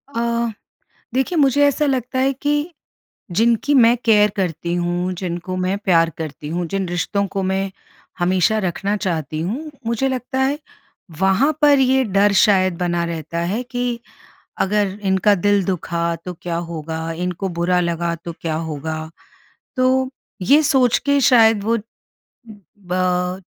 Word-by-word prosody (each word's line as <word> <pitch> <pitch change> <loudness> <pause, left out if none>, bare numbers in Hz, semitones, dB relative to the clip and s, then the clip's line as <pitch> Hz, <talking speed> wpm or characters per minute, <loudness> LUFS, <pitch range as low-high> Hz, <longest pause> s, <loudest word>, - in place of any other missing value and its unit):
अ, 235 0 0 0.7
देखिए 265 +7 0
मुझे 285 0 +4
ऐसा 295 +1 +1
लगता 260 -1 -1
है 270 +1 +2
कि, 295 +4 -1 0.6
जिनकी 230 +8 +2
मैं 240 -1 +6
केयर 210 -2 +5
करती 170 -2 -2
हूँ, 175 +1 -1
जिनको 180 0 -4
मैं 185 +2 0
प्यार 165 -3 +4
करती 155 -1 -6
हूँ, 170 +1 -2
जिन 195 -1 -2
रिश्तों 200 +3 -1
को 195 0 -3
मैं 190 +1 -1 0.5
हमेशा 185 +4 +2
रखना 195 +2 -1
चाहती 160 -6 -3
हूँ, 260 - -4 0.2
मुझे 235 +4 0
लगता 260 +1 -3
है 275 +3 +1 0.6
वहाँ 195 +11 +3
पर 290 -2 +6
ये 265 0 +3
डर 200 0 +3
शायद 185 -3 +3
बना 175 -1 0
रहता 165 0 -4
है 190 +8 -1
कि, 245 -1 -3 0.6
अगर 205 0 0
इनका 190 +2 +3
दिल 200 +1 +2
दुखा 170 -2 -1
तो 180 - -5
क्या 170 -1 -3
होगा, 165 -1 -5
इनको 180 +3 -3
बुरा 180 +1 +2
लगा 170 0 -1
तो 170 - -5
क्या 160 -2 -2
होगा? 160 0 -4 0.7
तो 260 0 +2 0.3
ये 285 +11 +5
सोच 260 -5 +3
के 285 0 +3
शायद 225 -5 +5
वो, 230 +2 +1 1.0
बा 180 0 -1
195 Hz, 145 wpm, -20 LUFS, 175-245 Hz, 1.0 s, मैं